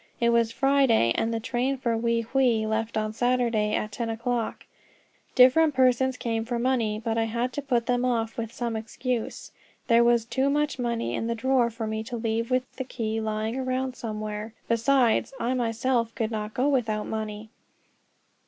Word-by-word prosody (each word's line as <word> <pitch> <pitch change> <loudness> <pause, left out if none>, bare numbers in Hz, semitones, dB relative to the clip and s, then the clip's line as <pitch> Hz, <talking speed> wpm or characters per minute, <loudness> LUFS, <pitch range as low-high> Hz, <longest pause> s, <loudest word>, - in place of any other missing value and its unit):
It 235 - +3
was 230 -1 +2
Friday, 270 - +3
and 225 - 0
the 230 - -1
train 255 +3 -1
for 235 -3 0
Wei 230 0 +1
Hwei 235 -2 +2
left 220 +1 -1
on 215 0 -1
Saturday 235 -3 +1
at 215 - -2
ten 230 +2 -3
o'clock. 235 0 -2 0.7
Different 275 +4 +6
persons 260 0 +3
came 225 -2 -2
for 240 +1 -3
money, 235 -4 0
but 225 0 -1
I 225 - +2
had 235 +3 -2
to 290 - -3
put 245 -4 0
them 245 0 +1
off 230 -3 0
with 230 -1 -4
some 235 -1 -3
excuse. 230 +2 -4 0.3
There 235 -1 +5
was 235 -1 +3
too 265 +3 0
much 295 -1 0
money 235 -1 -1
in 225 - -2
the 235 - -1
drawer 250 0 +2
for 230 0 -5
me 220 0 -3
to 240 0 -5
leave 230 +1 -1
with 255 0 -1
the 260 - -2
key 225 -3 -3
lying 220 +1 -2
around 260 0 -2
somewhere; 215 -1 -5
besides, 240 +2 +2
I 240 +2 0
myself 235 -1 0
could 225 -1 -2
not 215 -1 -4
go 255 +3 +2
without 225 -7 0
money. 215 0 -5
235 Hz, 180 wpm, -26 LUFS, 225-255 Hz, 0.7 s, Different